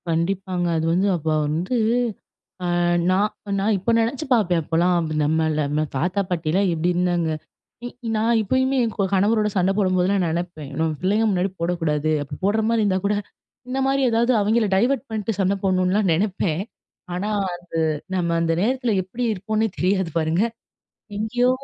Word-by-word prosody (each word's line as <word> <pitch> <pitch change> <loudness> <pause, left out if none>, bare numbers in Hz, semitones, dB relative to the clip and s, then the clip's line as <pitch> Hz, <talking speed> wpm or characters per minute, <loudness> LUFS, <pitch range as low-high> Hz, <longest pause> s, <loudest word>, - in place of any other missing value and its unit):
கண்டிப்பாங்க. 180 +2 -1
அது 160 - -1
வந்து 190 +3 +2
அப்ப 160 -1 -8 0.2
வந்து, 170 +10 -1 0.9
அ - - -1 0.5
நான், 200 +3 +2 0.3
நான் 210 +2 +2
இப்ப 210 +6 0
நினைச்சு 250 +7 -2
பார்ப்பேன். 180 -8 +2
அப்பல்லாம் 175 +3 +2 0.3
நம்மள 160 +1 +1
நம்ம 150 +1 0
தாத்தா 180 +8 0
பாட்டிலாம் 180 +3 +1
எப்பிடி 165 +2 0
இருந்தாங்க! 175 -2 +1 0.6
இ - - -3 0.3
நான் 230 +2 +2
இப்பயுமே 260 +5 +1
என் 225 -2 -1
க 195 -2 +1
கணவரோட 210 +3 +3
சண்டை 185 +1 +3
போடும்போதெல்லாம் 185 -1 +2
நினைப்பேன். 165 -3 -4
நம்ம 160 0 +1
பிள்ளைங்க 205 +4 +2
முன்னாடி 185 0 0
போடக்கூடாது. 160 -3 0
அப்பிடி 140 - -9
போட்றமாரி 220 +2 +2
இருந்தா 190 -2 +1
கூட 205 +1 +2 0.5
இந்த 265 +1 -2
மாதிரி 275 0 +1
ஏதாவது 235 +2 +2
அவெங்கள 220 +2 +2
டைவர்ட் 255 +6 +1
பண்ணிட்டு, 220 -1 -3
சண்டை 195 +1 +2
போட்ணுலாம் 185 +1 +2
நினைப்பேன். 185 -1 0 0.5
ஆனா, 190 +4 -2 0.3
அது 175 - -13 0.5
நம்ம 170 -2 0
அந்த 165 0 +1
நேரத்தில 245 +1 +1
எப்பிடி 225 +7 -5
இருப்போன்னே 215 +3 -1
தெரியாது 190 -1 +1
பாருங்க. 160 +4 +1 0.8
எங்கேயோ 245 +4 +1
190 Hz, 150 wpm, -22 LUFS, 170-215 Hz, 0.9 s, கணவரோட